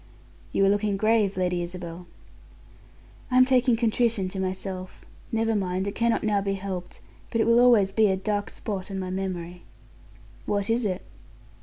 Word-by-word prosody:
"You 195 - +3
are - - +4
looking 205 0 +1
grave, 215 -2 +2
Lady 180 -1 0
Isabel." 175 0 -7 1.2
"I'm 255 0 +6
taking 255 -2 +3
contrition 225 -3 +1
to 190 +1 -5
myself. 185 0 -5 0.3
Never 225 0 +1
mind, 185 -1 -1
it 200 - -3
cannot 235 0 +1
now 210 -2 +2
be 195 0 -1
helped, 190 -2 -6 0.3
but 230 - -1
it - - +3
will 230 +1 +5
always 235 -6 +5
be 215 +1 +4
a 190 -1 +1
dark 205 +1 -2
spot 195 -3 -5
on 195 - -4
my 185 -1 -4
memory." 180 -2 -4 0.9
"What 205 +1 0
is 235 0 +1
it?" 185 -2 -2
200 Hz, 165 wpm, -26 LUFS, 185-225 Hz, 1.2 s, I'm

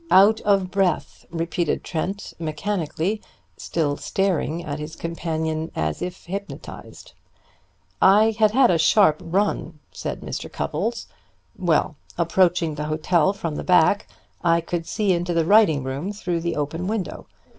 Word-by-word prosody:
"Out 205 +4 +6
of 195 -3 +2
breath," 190 -4 -1
repeated 170 0 -1
Trent 185 +4 -4
mechanically, 170 +4 -2 0.3
still 145 -4 -1
staring 175 -3 -1
at 145 0 -4
his 150 +2 -6
companion 160 -1 -3
as 80 -1 -2
if 180 0 -5
hypnotized. 200 +3 -8 0.9
"I 210 +3 +6
had 215 -1 +6
had 250 +1 +4
a 170 - +2
sharp 155 -1 +4
run," 175 -2 -1
said - - -5
Mr. - - -6
Cupples. - - -2 0.5
"Well, 160 -4 +1 0.2
approaching 170 -1 +2
the 150 0 -4
hotel 155 +3 +2
from 165 -6 -4
the - - -4
back 180 +2 +4 0.4
I 170 -1 +4
could 170 0 -4
see 210 -3 0
into 175 0 -1
the 165 -1 +2
writing 170 -8 +5
room 135 +9 -3
through 175 -4 -2
the 170 0 -2
open 155 +5 -3
window. 205 -5 -3
170 Hz, 140 wpm, -23 LUFS, 160-195 Hz, 0.9 s, Out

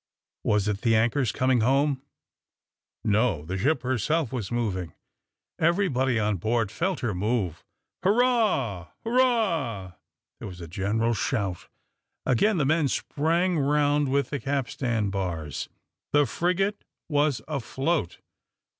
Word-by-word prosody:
Was 105 -1 +2
it 105 -1 -1
the 115 -2 +3
anchors 115 +1 +2
coming 130 0 +2
home? 135 +3 +2 1.0
No: 105 -7 +1
the 90 +4 -3
ship 130 +7 +1
herself 130 - 0
was 120 -5 -3
moving. 100 -8 -2 0.6
Everybody 155 -8 +2
on 105 -2 +1
board 110 +2 0
felt 175 +5 -1
her 120 -5 -1
move. 95 -3 -1 0.4
"Hurrah! 200 - +2 0.2
hurrah!" 205 - +1 0.5
There - - -6
was 90 -2 -9
a 85 - -7
general 105 +7 0
shout. 100 -6 -2 0.6
Again 180 - +3
the 150 - +2
men 155 +1 +3
sprang 165 +6 0
round 145 0 +2
with 140 +1 0
the 140 - -2
capstan 125 -6 -1
bars; 85 -7 -3 0.4
the 145 0 +5
frigate 190 +7 0 0.2
was 145 -3 +1
afloat. 140 - -1
130 Hz, 120 wpm, -26 LUFS, 105-155 Hz, 1.0 s, the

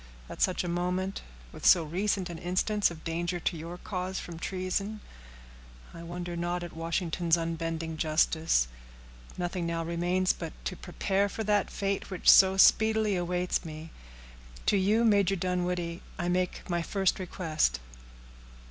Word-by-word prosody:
At - - -8
such 185 - +2
a - - -3
moment, 180 +2 -1 0.3
with - - -12
so 175 - +6
recent 185 +4 -1
an 165 - -7
instance 185 +4 +1
of 165 -2 -10
danger 170 +2 -2
to 175 - -1
your 165 +2 -7
cause 185 0 -4
from 170 -2 -8
treason, 195 +4 -2 0.9
I 170 - -9
wonder 175 +1 -5
not 175 +1 -2
at 175 - -8
Washington's 165 0 0
unbending 165 -1 -3
justice. 155 - +2 0.7
Nothing 175 -1 -2
now 165 0 -1
remains 175 +2 +1
but 165 -2 -7
to 185 - -2
prepare 195 +3 -1
for 220 - -4
that 205 -2 +1
fate 200 0 -2
which 185 -3 +5
so 190 0 +6
speedily 220 0 +5
awaits 180 0 -1
me. 160 -1 -8 0.7
To - - +3
you, 210 +5 +3
Major 200 -3 +4
Dunwoodie, 180 -1 -2 0.2
I 175 0 -1
make 180 0 -1
my 175 -1 0
first 195 +2 0
request." 160 - 0
180 Hz, 150 wpm, -29 LUFS, 170-190 Hz, 0.9 s, so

